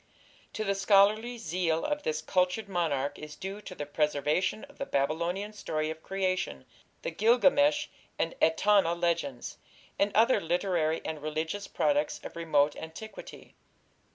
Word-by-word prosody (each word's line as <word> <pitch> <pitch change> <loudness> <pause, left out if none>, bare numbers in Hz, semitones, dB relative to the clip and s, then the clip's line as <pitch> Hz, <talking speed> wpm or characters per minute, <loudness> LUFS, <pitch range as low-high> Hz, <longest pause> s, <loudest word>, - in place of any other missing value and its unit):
To 215 - -2
the 200 -2 +1
scholarly 210 +4 +3
zeal 165 -4 -1
of 295 0 -1
this 155 - -2
cultured 185 +5 +1
monarch 155 -7 -1
is 150 0 -8
due 195 +2 -6
the 185 -7 -7
preservation 150 +6 0
of 285 0 -14
the 275 - -2
Babylonian 170 +9 -1
story 155 -6 -2
of 160 0 -8
creation, 185 - -2 0.4
the - - -2
Gilgamesh 275 - +4 0.3
and 165 - -1
Etana 170 +2 +4
legends, 165 -7 -2 0.4
and 200 +1 +3
other 230 +4 +4
literary 170 -2 0
and 155 -2 -4
religious 160 +6 -3
products 295 0 0
of - - -8
remote 150 -3 +2
antiquity. 160 +7 -10
175 Hz, 135 wpm, -29 LUFS, 155-210 Hz, 0.4 s, Gilgamesh